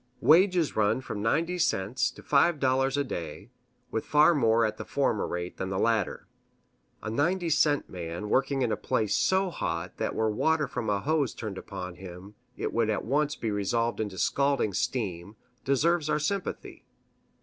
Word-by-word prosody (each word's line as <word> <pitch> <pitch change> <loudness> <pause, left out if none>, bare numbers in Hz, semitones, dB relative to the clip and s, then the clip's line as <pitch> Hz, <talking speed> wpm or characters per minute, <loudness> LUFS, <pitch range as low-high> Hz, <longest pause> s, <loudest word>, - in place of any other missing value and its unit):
Wages 175 0 +4
run 105 +3 +2
from 110 -5 -6
ninety 165 +11 0
cents 105 - +1
to - - -14
five 150 +2 +3
dollars 135 +1 +1
a 145 - +2
day, 95 - -6 0.4
with 110 - -2
far 150 +3 +5
more 115 -5 +3
at 110 0 -3
the - - -5
former 135 -7 0
rate 90 0 -5
than 95 - -3
the 95 - -2
latter. 115 0 0 0.8
A 110 - -3
ninety 170 +7 0
cent 145 -1 +2
man 85 +2 -6
working 135 +3 +1
in 120 - 0
a - - +1
place 110 -3 -1
so 190 0 +2
hot 85 - -4
that - - -2
were 110 -1 +1
water 155 +6 +1
from 125 -4 -4
a 100 -1 0
hose 150 -4 0
turned 105 -4 -5
upon 90 -2 -7
him 95 +2 -10 0.2
it - - -3
would 115 -1 +1
at 105 - -1
once 145 +4 +1
be 110 - -3
resolved 115 +4 -1
into 105 -4 -3
scalding 140 -5 +1
steam, 100 -3 -3 0.3
deserves 155 +4 +1
our - - +2
sympathy. 190 +6 -4
115 Hz, 175 wpm, -28 LUFS, 100-150 Hz, 0.8 s, far